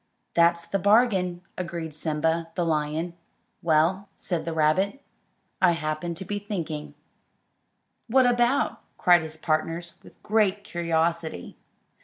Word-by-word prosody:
"That's 170 0 +3
the 195 +4 -1
bargain," 190 -4 +3 0.2
agreed 170 -3 -4
Simba, 160 +2 -1
the 175 - 0
lion. 155 +2 -1 0.5
"Well," 170 +5 +2
said 170 -4 -3
the 165 - -2
rabbit, 160 - +1 0.6
"I 180 -2 +5
happened 155 +1 -3
to 190 - -6
be 205 +2 -3
thinking." 165 -7 -5 1.1
"What 260 +2 +4
about?" 245 +3 +2 0.2
cried 175 -2 +5
his 160 0 -6
partners, 165 +2 -2
with - - -18
great 205 -2 +2
curiosity. 165 - -1
170 Hz, 120 wpm, -26 LUFS, 160-195 Hz, 1.1 s, I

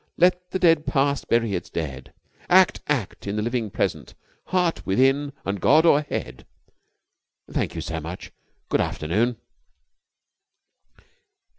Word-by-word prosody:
Let 180 +1 +2
the 185 - -2
dead 165 -4 +3
past 140 0 0
bury 115 -3 +1
its 90 - -4
dead! 70 -5 -5 0.4
Act, 185 +1 +5
act 125 -9 -2
in 100 - -2
the 105 - -1
living 120 -1 -2
Present, - - -3 0.3
Heart 180 -2 0
within 135 +7 +2
and 100 -1 -3
God 155 +5 +5
o'erhead!' 145 - 0 1.0
Thank - - -2
you - - -3
so 80 0 -4
much. 85 +3 -8 0.4
Good - - +1
afternoon." 110 +10 -1
125 Hz, 125 wpm, -24 LUFS, 95-160 Hz, 1.0 s, Act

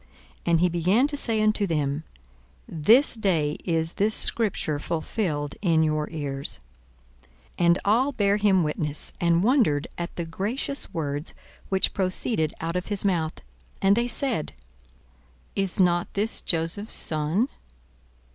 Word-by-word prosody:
42:004:021 - - -30 0.4
And 165 - +4
he 180 - +4
began 180 +9 +2
to 290 - -2
say 225 -5 +2
unto 215 -1 +2
them, 150 -2 -1 0.6
This 220 - +4
day 170 -9 0
is 165 -1 0
this 215 +2 +1
scripture 190 -9 0
fulfilled 155 -2 -2
in 165 -5 +3
your 155 -1 0
ears. 140 -3 -2 1.0
42:004:022 175 - +3
And 170 +1 +5
all 240 +7 +3
bare 205 -5 +2
him 200 -4 +3
witness, 150 -1 -3
and 170 0 +3
wondered 215 - +3
at 170 - -5
the 170 - -3
gracious 215 +11 -3
words 145 -1 -3 0.3
which 190 -1 +2
proceeded 185 -3 0
out 165 +1 -3
of 180 - -2
his 205 -1 -1
mouth. 165 -5 0 0.4
And 195 +1 +4
they 235 +2 +1
said, 245 - -1 1.0
Is 195 -1 -1
not 175 -2 +2
this 210 +3 -1
Joseph's 170 +6 -2
son? 155 - 0
175 Hz, 140 wpm, -25 LUFS, 160-210 Hz, 1.0 s, And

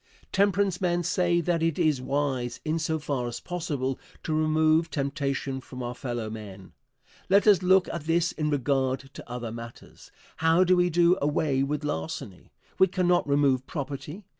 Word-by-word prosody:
Temperance 200 -2 +2
men 175 -1 +1
say 175 -1 +1
that 170 0 0
it 165 -2 +1
is 155 -7 +2
wise, 130 -3 -2
in 160 +1 0
so 160 0 -1
far 140 -5 -2
as 120 0 -5
possible, 145 -7 -3 0.2
to 160 - -2
remove 155 +1 +3
temptation 140 -2 -2
from 125 -1 -8
our 120 0 -3
fellow 120 -3 -4
men. 105 -3 -9 0.6
Let 200 +2 +5
us 205 -4 +6
look 185 +1 +4
at 170 -3 -5
this 170 +1 +2
in 150 -1 -2
regard 135 -2 0
to - - -11
other 120 -2 -5
matters. 115 0 -11 0.3
How 165 +3 +4
do 185 0 +4
we 180 0 +3
do 175 +2 +3
away 145 -1 +1
with 150 +2 -1
larceny? 90 - -5 0.3
We 190 - +7
cannot 180 -2 +1
remove 140 -2 +2
property. 145 +5 -6
150 Hz, 165 wpm, -27 LUFS, 130-175 Hz, 0.6 s, We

